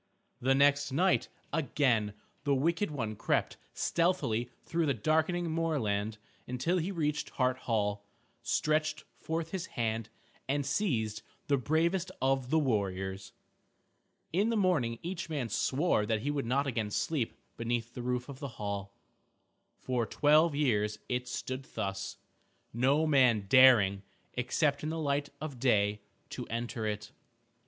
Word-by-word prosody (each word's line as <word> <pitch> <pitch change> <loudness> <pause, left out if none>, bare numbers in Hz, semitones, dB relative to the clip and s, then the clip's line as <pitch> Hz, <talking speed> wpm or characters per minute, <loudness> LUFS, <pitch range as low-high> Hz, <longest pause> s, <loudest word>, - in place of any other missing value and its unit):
The 135 +2 +3
next 140 0 +4
night, 180 +7 +2 0.3
again 125 -9 +1 0.3
the 140 -1 +2
wicked 165 +8 +1
one 115 -8 -3
crept - - 0 0.2
stealthily 165 -10 +1
through 165 -1 0
the 140 - +2
darkening 160 - +1
moorland 110 -11 0 0.3
until 165 +9 0
he 175 +4 -2
reached 150 -4 -1
Hart 130 -1 +1
Hall, 105 -2 0 0.4
stretched 155 0 0 0.2
forth 165 0 -3
his 185 -2 -3
hand, 110 -1 -1 0.4
and 145 0 +1
seized 115 - 0 0.2
the 140 - +2
bravest 170 +7 +1
of 135 -1 +1
the 160 - +3
warriors. 95 - -1 1.0
In 200 +6 +2
the 230 - +1
morning 155 - +2
each 180 0 -4
man 140 -7 -2
swore 130 - +1
that 110 -1 0
he 145 - -1
would 140 -4 -2
not 140 +4 +2
again 115 -6 -1
sleep 130 +3 -1 0.2
beneath 115 0 -2
the 125 - -6
roof 125 0 -2
of 140 -2 -9
the 140 - -4
hall. 100 -1 -4 0.8
For 125 -3 -1
twelve 150 +1 +4
years 105 -7 +1
it 125 0 -1
stood 130 +2 -4
thus, 95 +1 -3 0.6
no 135 +7 +3
man 125 -8 +4
daring, 110 -6 +6 0.3
except 140 +4 +1
in 155 - -2
the 160 - -3
light 145 -2 0
of 145 -5 -6
day, 105 -4 +2 0.3
to - - -5
enter 115 0 -3
it. 105 0 -4
130 Hz, 140 wpm, -31 LUFS, 110-155 Hz, 1.0 s, daring